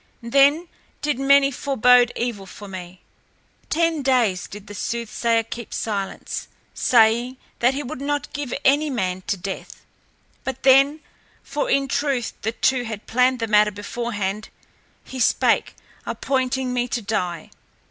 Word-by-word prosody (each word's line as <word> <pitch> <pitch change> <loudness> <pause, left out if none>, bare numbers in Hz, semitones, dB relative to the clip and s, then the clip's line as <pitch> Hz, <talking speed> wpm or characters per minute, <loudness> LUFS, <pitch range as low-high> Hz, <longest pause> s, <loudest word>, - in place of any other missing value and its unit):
Then 280 +7 +4 0.4
did 290 -3 0
many 275 0 +5
forbode 250 -2 +4
evil 230 -5 -3
for 205 - -10
me. 185 -1 -9 0.7
Ten 330 -1 +1
days 240 -9 +1
did 205 0 -10
the 205 - -10
soothsayer 230 +1 -1
keep 230 0 -7
silence, 200 -3 -4 0.3
saying 240 +2 +3 0.2
that 250 +3 +3
he 290 - -3
would 275 +1 -7
not 290 0 -2
give 285 -4 -4
any 290 +3 +4
man 185 -8 -2
to 200 - 0
death. 190 +1 -7 0.6
But 265 - -5
then, 275 +3 +5 0.4
for 290 +1 -3
in 275 0 +2
truth 270 -3 -1
the 220 - -1
two 255 +2 +1
had 220 -3 -6
planned 250 +2 +2
the 230 - -2
matter 210 0 +5
beforehand, 205 -1 -4 0.5
he 260 - -8
spake, 235 - +2 0.3
appointing 260 -1 -1
me 245 0 0
to 235 -1 -3
die. 180 -6 -3
245 Hz, 140 wpm, -22 LUFS, 210-275 Hz, 0.7 s, many